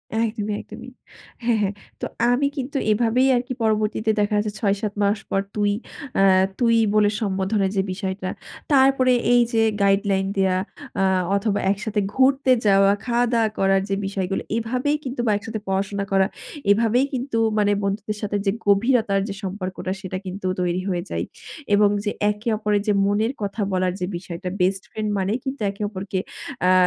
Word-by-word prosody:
একদমই, 215 Hz, -2 st, -1 dB
একদমই। -, -, -11 dB, 0.5 s
হ্যাঁ, 235 Hz, -2 st, +2 dB
হ্যাঁ। 200 Hz, 0 st, 0 dB, 0.3 s
তো -, -, -1 dB, 0.3 s
আমি 280 Hz, +3 st, +2 dB
কিন্তু 275 Hz, +2 st, -3 dB
এভাবেই 235 Hz, +4 st, +3 dB
আরকি 250 Hz, +1 st, -2 dB
পরবর্তীতে 215 Hz, 0 st, +1 dB
দেখা 210 Hz, +1 st, +1 dB
যাচ্ছে 210 Hz, 0 st, 0 dB
৬-৭ 205 Hz, 0 st, 0 dB
মাস 200 Hz, +1 st, +2 dB
পর 195 Hz, -, +1 dB
তুই 205 Hz, -1 st, +2 dB, 0.4 s
অ্যা 195 Hz, -, +4 dB, 0.3 s
তুই 230 Hz, -2 st, +4 dB, 0.2 s
বলে 210 Hz, -1 st, +5 dB
সম্বোধনের 195 Hz, 0 st, 0 dB
যে -, -, +4 dB
বিষয়টা। 190 Hz, -1 st, -4 dB, 0.4 s
তারপরে 265 Hz, -1 st, +5 dB, 0.2 s
এই 245 Hz, -, +6 dB
যে 225 Hz, -, +4 dB, 0.2 s
গাইডলাইন 195 Hz, -1 st, +2 dB
দেয়া 190 Hz, -1 st, +2 dB, 0.4 s
অ্যা 195 Hz, -, +3 dB, 0.3 s
অথবা 200 Hz, 0 st, 0 dB
একসাথে 210 Hz, +1 st, -1 dB
ঘুরতে 265 Hz, 0 st, +3 dB
যাওয়া, 195 Hz, 0 st, +5 dB
খাওয়া-দাওয়া 235 Hz, -2 st, +2 dB
করার 195 Hz, 0 st, +3 dB
যেই 195 Hz, 0 st, 0 dB
বিষয়গুলো 195 Hz, -1 st, -2 dB, 0.2 s
এভাবেই 255 Hz, +6 st, 0 dB
কিন্তু 250 Hz, -1 st, -3 dB
বা -, -, +4 dB
একসাথে 220 Hz, +1 st, -5 dB
পড়াশোনা 200 Hz, +1 st, -1 dB
করা। 195 Hz, 0 st, +4 dB, 0.4 s
এভাবেই 230 Hz, +5 st, +3 dB
কিন্তু 255 Hz, -2 st, -2 dB, 0.2 s
মানে 205 Hz, -1 st, +3 dB
বন্ধুদের 205 Hz, +1 st, -2 dB
সাথে 205 Hz, -1 st, -1 dB
যে 195 Hz, -, +3 dB
গভীরতার 205 Hz, -1 st, +3 dB
যে -, -, -3 dB
সম্পর্কটা 185 Hz, -1 st, -4 dB
সেটা 185 Hz, -1 st, -4 dB
কিন্তু 185 Hz, +1 st, -4 dB
তৈরি 180 Hz, +1 st, 0 dB
হয়ে 175 Hz, -2 st, -1 dB
যায়। -, -, -2 dB, 0.5 s
এবং 205 Hz, 0 st, +5 dB
যে 210 Hz, -, -1 dB, 0.2 s
একে 210 Hz, +3 st, -4 dB
অপরের 210 Hz, -1 st, +1 dB
যে 210 Hz, -, +4 dB
মনের 215 Hz, +5 st, +1 dB
কথা 205 Hz, +1 st, -3 dB
বলার 185 Hz, -1 st, +1 dB
যে 180 Hz, -, -1 dB
বিষয়টা 180 Hz, +1 st, -6 dB
বেস্ট 190 Hz, +1 st, +1 dB
ফ্রেন্ড 215 Hz, -1 st, -3 dB
মানেই 200 Hz, +6 st, 0 dB
কিন্তু 265 Hz, -3 st, -4 dB
একে 200 Hz, -, -12 dB
অপরকে 190 Hz, -1 st, -4 dB, 0.4 s
অ্যা 185 Hz, +1 st, +4 dB
205 Hz, 165 wpm, -23 LUFS, 195-230 Hz, 0.5 s, এই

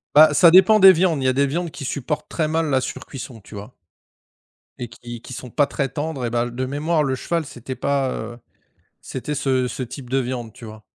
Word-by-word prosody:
Bah, 155 Hz, 0 st, +8 dB
ça 170 Hz, +2 st, +6 dB
dépend 215 Hz, +4 st, +7 dB
des 190 Hz, -1 st, +9 dB
viandes, 165 Hz, -4 st, +1 dB
il -, -, -2 dB
y -, -, +4 dB
a 130 Hz, -, +3 dB
des 140 Hz, +2 st, +2 dB
viandes 170 Hz, +4 st, -2 dB
qui -, -, -8 dB
supportent 145 Hz, +3 st, -3 dB
très 155 Hz, -2 st, -1 dB
mal 160 Hz, 0 st, 0 dB
la 130 Hz, -2 st, +2 dB
surcuisson, 125 Hz, -2 st, -7 dB
tu 105 Hz, -, -13 dB
vois 105 Hz, +5 st, -10 dB, 1.0 s
et 120 Hz, -2 st, -5 dB
qui 120 Hz, 0 st, -10 dB
qui 130 Hz, -, -10 dB
sont 125 Hz, +1 st, -8 dB
pas 145 Hz, +5 st, +2 dB
très 135 Hz, -3 st, -2 dB
tendres 145 Hz, -2 st, -4 dB
et -, -, -1 dB
bah, 120 Hz, +1 st, -1 dB
de 130 Hz, +2 st, -4 dB
mémoire, 150 Hz, +3 st, 0 dB
le 130 Hz, -1 st, 0 dB
cheval 165 Hz, +3 st, -2 dB
c'était 130 Hz, 0 st, -8 dB
pas, 135 Hz, 0 st, 0 dB
heu, 120 Hz, -, -6 dB, 0.6 s
c'était 140 Hz, +3 st, -5 dB
ce 130 Hz, -2 st, 0 dB
ce 130 Hz, -, -5 dB
type 125 Hz, +1 st, -10 dB
de 135 Hz, -, +2 dB
viande, 120 Hz, -3 st, -4 dB
tu 115 Hz, -, -13 dB
vois? 110 Hz, -1 st, -11 dB
135 Hz, 230 wpm, -21 LUFS, 120-155 Hz, 1.0 s, des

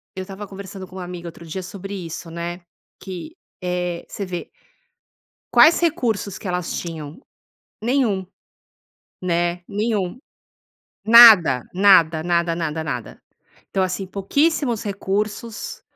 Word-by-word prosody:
eu 190 Hz, -, -4 dB
estava 195 Hz, +2 st, -8 dB
conversando 195 Hz, 0 st, -9 dB
com 185 Hz, -, -15 dB
uma 185 Hz, -, -5 dB
amiga 175 Hz, -1 st, -7 dB
outro 170 Hz, 0 st, -13 dB
dia 185 Hz, +4 st, -5 dB
sobre 195 Hz, +2 st, -8 dB
isso, 170 Hz, -2 st, -6 dB
né? 170 Hz, +1 st, -5 dB, 0.4 s
Que, 195 Hz, -, -8 dB, 0.3 s
eh, 180 Hz, -1 st, -2 dB
você 200 Hz, -, -5 dB
vê 180 Hz, -2 st, -6 dB, 1.1 s
quais 320 Hz, +2 st, +7 dB
recursos 225 Hz, -, -1 dB
que -, -, -7 dB
elas 180 Hz, -1 st, -2 dB
tinham? 160 Hz, -, -6 dB, 0.6 s
Nenhum. 230 Hz, -6 st, +1 dB, 0.9 s
Né. 175 Hz, 0 st, -1 dB
Nenhum. 210 Hz, -1 st, -2 dB, 0.8 s
Nada, 215 Hz, -, +8 dB
nada, 175 Hz, -5 st, +5 dB
nada, 170 Hz, 0 st, +1 dB
nada, 160 Hz, -1 st, -3 dB
nada. 125 Hz, -7 st, -5 dB, 0.5 s
Então, 190 Hz, -, 0 dB
assim, 185 Hz, +1 st, -1 dB
pouquíssimos 240 Hz, -, 0 dB
recursos, 210 Hz, +3 st, -3 dB
185 Hz, 120 wpm, -22 LUFS, 175-205 Hz, 1.1 s, Nada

